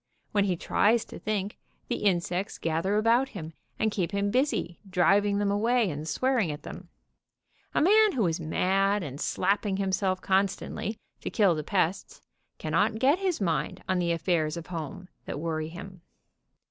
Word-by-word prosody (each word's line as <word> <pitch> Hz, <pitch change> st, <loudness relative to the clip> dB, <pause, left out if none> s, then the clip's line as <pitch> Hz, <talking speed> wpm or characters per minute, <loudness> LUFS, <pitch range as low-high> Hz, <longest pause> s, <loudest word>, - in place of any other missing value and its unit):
When 205 Hz, -1 st, +2 dB
he 185 Hz, -3 st, +1 dB
tries 220 Hz, +6 st, +2 dB
to -, -, -10 dB
think, 205 Hz, -1 st, -3 dB, 0.3 s
the -, -, -1 dB
insects 185 Hz, -1 st, 0 dB
gather 165 Hz, +5 st, 0 dB
about 235 Hz, +5 st, +3 dB
him, 160 Hz, -2 st, -7 dB, 0.2 s
and 220 Hz, 0 st, +1 dB
keep 185 Hz, -2 st, -2 dB
him 200 Hz, 0 st, 0 dB
busy 250 Hz, -, 0 dB
driving 200 Hz, +3 st, +3 dB
them 205 Hz, -1 st, +1 dB
away, 225 Hz, 0 st, +2 dB
and 150 Hz, +2 st, -6 dB
swearing 255 Hz, -1 st, +1 dB
at 150 Hz, -, -7 dB
them. -, -, -9 dB, 0.9 s
A -, -, +3 dB
man 425 Hz, +5 st, +5 dB
who 230 Hz, -6 st, +1 dB
is 165 Hz, 0 st, 0 dB
mad, 195 Hz, +5 st, +1 dB
and 140 Hz, -1 st, -6 dB
slapping 195 Hz, +1 st, 0 dB
himself 190 Hz, -1 st, 0 dB
constantly 195 Hz, +3 st, -1 dB, 0.2 s
to -, -, -4 dB
kill 200 Hz, -5 st, +3 dB
the 155 Hz, -1 st, -3 dB
pests, 190 Hz, +2 st, -1 dB, 0.4 s
cannot 215 Hz, +1 st, +1 dB
get 275 Hz, +9 st, +3 dB
his 375 Hz, -4 st, 0 dB
mind 170 Hz, -5 st, -1 dB
on 185 Hz, -1 st, +1 dB
the 170 Hz, -1 st, +1 dB
affairs 165 Hz, -2 st, 0 dB
of 170 Hz, -, -6 dB
home, 165 Hz, +3 st, -6 dB, 0.2 s
that -, -, -5 dB
worry 155 Hz, -1 st, -2 dB
him. 185 Hz, +1 st, -10 dB
195 Hz, 165 wpm, -28 LUFS, 170-210 Hz, 0.9 s, man